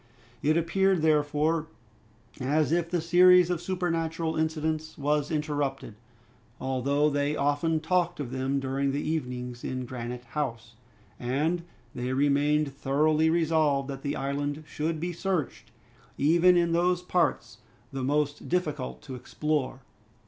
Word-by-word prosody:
It 155 +2 +2
appeared, 185 +1 +2
therefore, 155 +1 +2 0.7
as 150 +4 +1
if 170 0 +1
the 175 -1 0
series 180 +1 +6
of 175 -2 -1
supernatural 165 -3 -2
incidents 155 0 -2
was 145 0 0
interrupted, 145 -6 -2 0.7
although 135 +3 +1
they 145 +1 0
often 145 +3 +1
talked 175 +1 0
of 130 -4 -4
them 130 +1 -1
during 135 +1 -1
the 145 +2 -2
evenings 125 -5 -3
in 130 -1 -3
Granite 125 0 -6
House, 115 -4 -4 0.5
and 150 +8 0 0.3
they 125 +1 -3
remained 145 +1 +2
thoroughly 150 +3 +2
resolved 160 -4 +2
that 135 -1 -5
the 140 +1 -2
island 145 +2 -3
should 155 +1 -3
be 175 +2 -3
searched, 170 -5 -3 0.5
even 170 +5 +5
in 170 -1 +2
those 180 +1 +2
parts 180 -1 0 0.3
the 135 -1 -3
most 145 +2 -1
difficult 150 -7 -2
to 135 - -8
explore. 135 +1 -2
150 Hz, 130 wpm, -28 LUFS, 135-165 Hz, 0.7 s, series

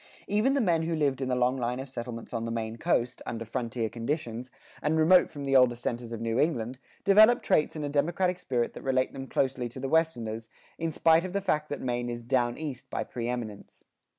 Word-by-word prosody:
Even 215 +7 +2
the 280 - +2
men 170 -7 +2
who 165 0 -1
lived 140 -4 +1
in 130 - -1
the 125 - +1
long 125 +1 +2
line 125 0 -2
of 135 - -5
settlements 120 -2 -7
on 115 -1 -2
the 115 - -3
Maine 115 -1 -3
coast, 120 +2 0
under 115 -1 -4
frontier 115 0 -2
conditions, 120 0 -4 0.3
and 150 +2 +1
remote 175 +3 +6
from 145 -2 -7
the 135 0 +1
older 125 -2 +6
centers 120 0 -4
of 115 - -4
New 115 +1 -1
England, 125 -5 0 0.2
developed 215 +4 +6
traits 155 - +2
and 150 -1 -3
a - - -2
democratic 175 +5 +1
spirit 120 -8 -1
that - - -9
relate 130 -1 +1
them 135 0 -6
closely 130 -3 0
to 125 - -9
the 135 - -3
Westerners, 115 -8 0 0.3
in 165 0 -1
spite 165 +1 +4
of 185 -1 -5
the 200 - +1
fact 150 -5 0
that 145 - -4
Maine 120 -1 -2
is 120 0 -5
"down 120 -1 +1
east" 145 -5 -6
by - - -2
preëminence. 120 -3 -5
130 Hz, 220 wpm, -28 LUFS, 120-155 Hz, 0.3 s, remote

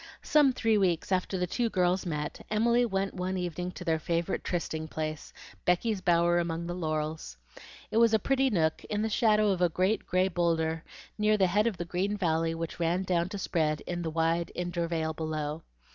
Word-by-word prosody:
Some 295 -3 +5
three 225 -4 +2
weeks 180 -2 0
after 185 +1 0
the 180 - 0
two 235 +6 -1
girls 180 -1 +1
met, 150 -2 -4
Emily 235 +3 +3
went 195 -1 -1
one 185 +1 -2
evening 180 0 -3
to 180 - -8
their 160 -2 +1
favorite 170 +3 -1
trysting 160 -3 -3
place, 155 -1 -5 0.3
Becky's 190 +3 +1
bower 175 0 +3
among 170 0 -2
the 175 - -3
laurels. 155 - -3 0.5
It - - 0
was 230 -1 +5
a 220 - +5
pretty 270 +5 +1
nook 160 -8 0
in 210 0 -2
the 220 - 0
shadow 215 -1 +3
of 185 -2 -1
a 175 - +4
great 185 +6 0
gray 185 +1 +2
bowlder 165 -2 0 0.4
near 210 0 +3
the 195 - +4
head 205 +5 +2
of 215 -6 -2
the 175 - -4
green 190 +5 -1
valley 165 -3 0
which 165 +1 -5
ran 175 +2 +1
down 175 -1 0
to 200 - -5
spread 155 -5 0
into 175 0 -4
the 165 - -2
wide 165 +1 0
intervale 170 -2 -2
below. 155 -1 -3
175 Hz, 195 wpm, -29 LUFS, 165-195 Hz, 0.5 s, Some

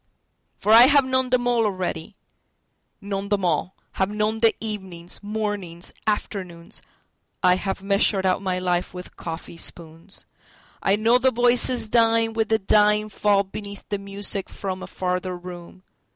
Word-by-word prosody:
For 210 - 0
I 235 +3 +9
have 285 -1 +5
known 260 0 0
them 250 -1 +1
all 240 -2 +2
already, 185 -3 -3 0.9
known 200 0 -4
them 200 -2 +1
all:Have 180 +3 -2
known 210 +1 -1
the 225 0 +4
evenings, 190 -6 -5
mornings, 205 -5 -4
afternoons,I 180 -3 -3
have 195 0 -4
measured 195 -1 +2
out 185 +1 +2
my 185 -2 -1
life 180 0 -1
with 180 0 -9
coffee 165 0 -7
spoons;I 170 +4 -4
know 230 +4 +3
the 260 +1 +4
voices 245 -1 +2
dying 225 0 +3
with 225 -1 -1
a 220 - +5
dying 210 +1 +3
fallBeneath 200 0 -1
the 205 - -2
music 200 -1 -5
from 190 -1 -5
a - - -7
farther 180 0 -3
room. 175 +1 -11
200 Hz, 135 wpm, -23 LUFS, 185-220 Hz, 0.9 s, I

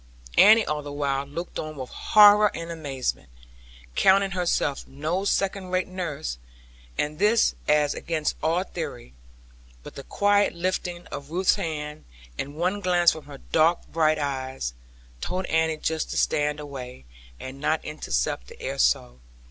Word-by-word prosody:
Annie 220 +2 +7
all 150 0 -2
the 145 0 -8
while 140 -1 -1
looked 170 +5 -6
on 155 0 -5
with 130 -3 -7
horror 210 0 +6
and 165 0 -5
amazement, 140 - -4 0.7
counting 195 0 +4
herself 175 -6 -1
no 155 +8 -2
second 195 -1 0
rate 185 0 0
nurse, 155 - -4 0.6
and 150 +1 -2
this 215 +3 +4
as 150 -1 +3
against 160 -2 -2
all 165 +3 +1
theory. 65 - -7 0.7
But - - -10
the - - -8
quiet 205 +4 +2
lifting 175 0 -2
of 140 0 -7
Ruth's 180 +3 +3
hand, 150 - -4 0.3
and 140 - -5
one 180 +5 0
glance 175 -2 +4
from 155 -2 -8
her 140 -1 -10
dark 165 +2 +3
bright 155 -1 +2
eyes, 130 - -3 0.5
told 185 +1 -2
Annie 160 -1 +1
just 160 0 -2
to - - -4
stand 150 0 +1
away, 130 - -8 0.3
and 130 +1 -8
not 155 +1 0
intercept - - -2
the - - -13
air - - -4
so. - - +1
155 Hz, 150 wpm, -25 LUFS, 140-180 Hz, 0.7 s, Annie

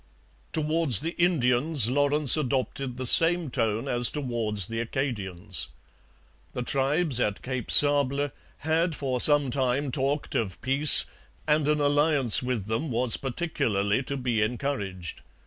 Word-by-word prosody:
Towards 155 - +1
the 165 +2 -4
Indians 140 - +3
Lawrence 145 +1 +3
adopted 135 -2 -4
the 130 - -5
same 165 +3 +3
tone 115 -3 -2
as 120 -1 +1
towards 115 - -2
the 115 +3 -6
Acadians. 105 - -4 0.9
The 125 - -5
tribes 140 +2 0
at 105 -4 -3
Cape 130 -2 -6
Sable 145 -1 +3 0.3
had 160 +2 -2
for 130 -4 -3
some 145 -3 +3
time 130 +2 -2
talked 140 +2 -3
of 95 -6 -3
peace, 135 +4 +6 0.4
and 150 -1 0
an 150 0 0
alliance 145 -4 +2
with 125 -6 -4
them 110 +9 -4
was 120 0 +1
particularly 120 - -3
to 140 +1 -5
be 125 -4 -2
encouraged. 105 - -5
130 Hz, 130 wpm, -25 LUFS, 115-145 Hz, 0.9 s, peace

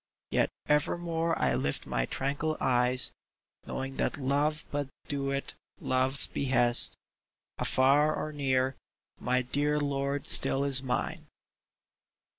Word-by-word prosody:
Yet - - +2 0.2
evermore 165 +2 0
I - - +1
lift 70 - -2
my - - -1
tranquil 145 +4 -2
eyes, 125 0 +2 0.6
Knowing 135 0 -5
that - - -1
Love 145 +3 0
but 145 -1 -2 0.2
doeth 140 -1 -3 0.3
Love's 130 +2 +1
behest 120 -3 +3 0.3
— - - -64
Afar 140 +4 +3
or 155 - -4
near, 130 -2 0 0.4
my 125 +1 0
dear 145 +4 0
lord 140 -1 -2
still 135 - +5
is 140 -1 +4
mine 125 -2 -3
140 Hz, 115 wpm, -29 LUFS, 130-145 Hz, 0.6 s, still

